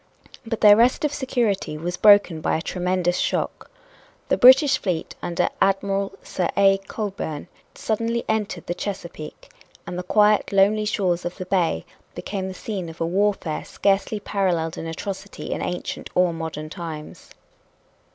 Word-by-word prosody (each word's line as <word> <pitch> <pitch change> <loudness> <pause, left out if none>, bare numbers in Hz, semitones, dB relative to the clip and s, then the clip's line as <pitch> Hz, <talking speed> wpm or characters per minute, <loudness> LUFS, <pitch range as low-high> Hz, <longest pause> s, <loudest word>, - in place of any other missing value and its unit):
But 225 -1 -3
their 205 -1 +9
rest 245 +8 +3
of 295 - -1
security 235 - -1
was 175 +3 -3
broken 200 -5 +5
by - - +1
a - - -4
tremendous 180 -1 -1
shock. - - -2 0.6
The - - +4
British 265 +3 +7
fleet 175 -5 -3
under 170 - 0
Admiral 195 0 +1
Sir 180 - -2
A. 195 -1 +5
Cockburn 190 -8 -5 0.3
suddenly 230 +2 -1
entered 210 -5 -2
the 175 - -2
Chesapeake. 170 -5 -7 0.3
And 180 0 -5
the - - -1
quiet, 210 +3 +3
lonely 205 +2 +3
shores 185 -4 0
of 175 - -5
the 185 - -5
bay 175 - 0 0.3
became 195 -2 -4
the 190 - -7
scene 190 -4 -5
of 165 - -12
a 165 - 0
warfare 185 -3 0
scarcely 200 +2 0
paralleled 180 -6 -1
in 165 - -6
atrocity 195 +4 -6
in - - -2
ancient 180 0 -4
or 180 -1 +3
modern 160 -2 -6
times. 160 -3 -8
190 Hz, 150 wpm, -23 LUFS, 170-210 Hz, 0.6 s, their